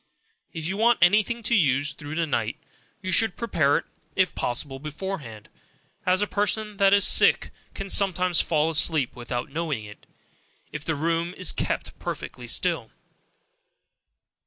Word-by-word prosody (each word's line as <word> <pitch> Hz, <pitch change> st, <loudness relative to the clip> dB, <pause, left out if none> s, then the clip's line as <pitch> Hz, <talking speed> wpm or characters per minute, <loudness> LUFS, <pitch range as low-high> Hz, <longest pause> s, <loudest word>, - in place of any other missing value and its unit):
If 160 Hz, -1 st, -6 dB
you 190 Hz, +2 st, -3 dB
want 235 Hz, +2 st, +3 dB
any 210 Hz, +4 st, +5 dB
thing 235 Hz, +2 st, -6 dB
to 220 Hz, -, 0 dB
use 145 Hz, -, +2 dB
through 145 Hz, +1 st, -8 dB
the 165 Hz, 0 st, 0 dB
night, 115 Hz, -6 st, -2 dB, 0.5 s
you 185 Hz, -, -3 dB
should 215 Hz, +1 st, +3 dB
prepare 155 Hz, -11 st, +1 dB
it, -, -, -5 dB, 0.3 s
if 185 Hz, -1 st, +1 dB
possible, 135 Hz, +2 st, -3 dB
beforehand; 150 Hz, -, -7 dB, 0.6 s
as 185 Hz, +2 st, +3 dB
a -, -, +1 dB
person 210 Hz, +1 st, -1 dB
that 195 Hz, -1 st, +4 dB
is 200 Hz, -1 st, +5 dB
sick, -, -, +5 dB, 0.2 s
can 195 Hz, -, -6 dB
sometimes 185 Hz, -3 st, +4 dB
fall 155 Hz, 0 st, +1 dB
asleep 155 Hz, -4 st, +2 dB
without 120 Hz, +1 st, -5 dB
knowing 150 Hz, -8 st, -3 dB
it, 105 Hz, 0 st, -14 dB, 0.6 s
if 155 Hz, -1 st, -6 dB
the 160 Hz, 0 st, -2 dB
room 165 Hz, +4 st, -2 dB
is -, -, +3 dB
_kept -, -, -3 dB
perfectly -, -, -6 dB
still. -, -, -1 dB
165 Hz, 155 wpm, -25 LUFS, 145-195 Hz, 0.6 s, any